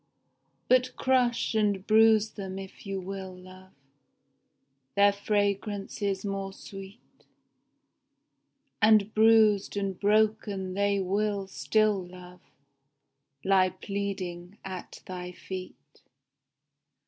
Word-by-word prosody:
But 255 0 +3
crush 250 -3 +1
and 205 -3 +1
bruise 220 0 +5
them 190 -2 -7
if 195 +1 -10
you 195 -1 -3
will, 190 0 -7
love, 185 +1 -14 1.2
Their 200 0 +5
fragrance 205 0 -2
is 200 -1 -1
more 195 -1 -3
sweet, 195 +3 -11 1.8
And 215 -1 +5
bruised 215 -2 +4
and 195 -2 -2
broken 210 -2 +1
they 200 +1 +1
will 200 +1 -1
still, 195 +6 +1
love. 180 0 -13 1.0
Lie 190 -1 +4
pleading 190 -1 -5
at 185 -1 -8
thy 180 -1 -7
feet. 185 0 -7
200 Hz, 95 wpm, -28 LUFS, 190-210 Hz, 1.8 s, bruise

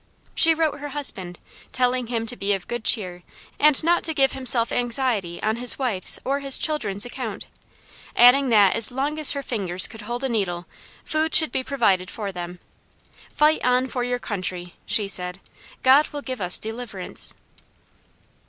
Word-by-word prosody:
She 325 0 +6
wrote 310 -2 -1
her 290 +1 -7
husband, 190 -11 -3 0.3
telling 250 -1 0
him 230 -1 -3
to 230 - -5
be 205 -2 -1
of 195 -2 -5
good 240 -2 -5
cheer, 180 -7 -1 0.4
and 300 0 +4
not 345 +2 +1
to 320 -2 0
give 270 -2 +2
himself 245 -3 +2
anxiety 240 -8 -1
on 220 +1 -1
his 245 +1 +2
wife's 235 -9 +2
or 275 +2 -1
his 275 -1 +3
children's 220 -10 -1
account, 245 -4 -6 0.7
adding 250 +3 +5
that 205 -4 +4
as 230 -2 +4
long 285 +4 -3
as 305 - +4
her 280 -1 -5
fingers 190 -7 +2
could 225 -1 -8
hold 240 +4 -6
a - - 0
needle, 180 -6 -3 0.4
food 315 0 0
should 315 -3 +5
be 260 - -2
provided 200 -10 0
for 205 -2 -5
them. 180 -1 -8 0.7
"Fight 305 +1 +2
on 250 +1 +2
for 250 -1 -4
your 245 0 -2
country," 185 -6 -4
she 210 -2 +1
said; 180 -1 -3 0.4
"God 270 +4 +5
will 290 -1 -8
give 255 -4 -6
us 180 -1 +3
deliverance." 220 -4 -4
245 Hz, 170 wpm, -22 LUFS, 200-270 Hz, 0.7 s, She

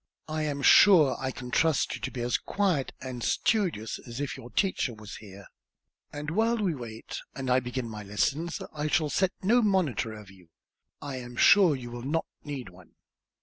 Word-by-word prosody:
I 155 0 -2
am 145 -2 -2
sure 170 -7 +7
I 130 - -2
can 125 -1 -7
trust 160 +1 +2
you - - -6
to - - -2
be 125 - -6
as 120 +1 0
quiet 185 -9 0
and 125 -2 -6
studious 175 - 0
as 120 +1 -9
if 145 -1 -3
your 120 - -10
teacher 185 - 0
was 105 -2 -9
here; 100 -2 -12 0.7
and 150 +1 -5
while 225 +6 +2
we 200 -6 0
wait, 115 -5 -7 0.2
and 130 -2 -3
I 125 - +5
begin 125 -1 -4
my 110 -2 -7
lessons, 140 +11 -1
I 150 0 -2
shall 150 -1 +1
set 190 -1 +2
no 235 +6 +4
monitor 155 - 0
over 105 -3 -12
you. 90 -3 -20 0.5
I 140 -2 -5
am 125 -1 -8
sure 185 +2 +6
you 120 -2 -8
will 120 0 -6
not 150 +6 -1 0.2
need 140 -7 -6
one." 90 -1 -18
135 Hz, 190 wpm, -28 LUFS, 120-165 Hz, 0.7 s, sure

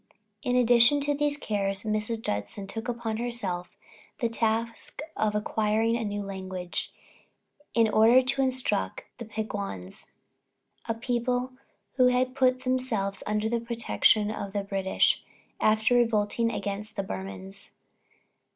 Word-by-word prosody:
In 250 - 0
addition 245 +3 +6
to 290 +1 +1
these 290 0 +1
cares, 195 -6 -1
Mrs. 215 +1 -2
Judson 105 - -3
took 225 +4 -6
upon 235 -2 -2
herself 220 -7 -4 0.4
the 235 -4 0
task 230 0 -1 0.2
of 210 -1 0
acquiring 215 +2 +1
a 235 - -1
new 205 -1 -3
language, 190 -2 -4 0.8
in 230 -1 +5
order 225 +4 +6
to 270 +2 0
instruct 255 - 0 0.2
the 235 - -5
Peguans, 200 - -5 0.8
a 225 - +1
people 245 +2 -1 0.5
who 255 -1 +6
had 250 +1 +2
put 255 -1 +2
themselves 250 -6 -1
under 210 +1 0
the 235 +1 0
protection 230 -2 +2
of 200 -2 -5
the 205 -1 -1
British, 195 -1 +2 0.4
after 215 +2 +3
revolting 230 -1 +2
against 210 +1 -4
the 200 - -1
Burmans. 95 - -7
220 Hz, 130 wpm, -28 LUFS, 200-245 Hz, 0.8 s, addition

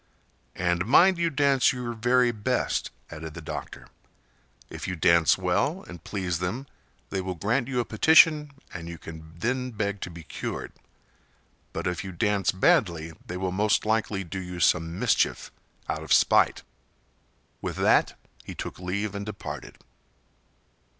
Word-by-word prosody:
"And 90 +1 0
mind 180 +8 +6
you 170 -1 +2
dance 140 -3 +3
your 125 -2 -4
very 120 +2 +3
best," 120 +3 -1 0.2
added 80 0 -8
the - - -6
doctor. 80 - -7 0.8
"If - - -7
you 90 - -2
dance 85 0 +4
well 95 - 0
and 90 - -10
please 90 -5 -2
them 95 +10 -3 0.5
they 95 - -1
will 95 0 -4
grant 110 +7 0
you 130 -2 -1
a 120 - 0
petition 155 +5 +5 0.2
and 85 -1 -7
you 85 - -7
can 80 0 -11
then 125 +6 -1
beg 100 -3 -3
to - - -4
be 85 -1 -10
cured; - - -5 1.0
but - - -4
if 90 +2 -2
you 95 - -6
dance 100 +2 +1
badly 85 -3 +2
they 90 - -4
will 95 0 -2
most 105 +3 +1
likely 110 -2 0
do 95 +2 -6
you 90 -1 -6
some 85 0 +2
mischief - - +1 0.4
out - - -2
of - - -9
spite." - - +4 1.0
With - - -4
that - - +3 0.3
he - - -8
took - - -6
leave 100 +3 -2
and 100 0 -4
departed. 75 -10 -7
95 Hz, 155 wpm, -26 LUFS, 85-120 Hz, 1.0 s, mind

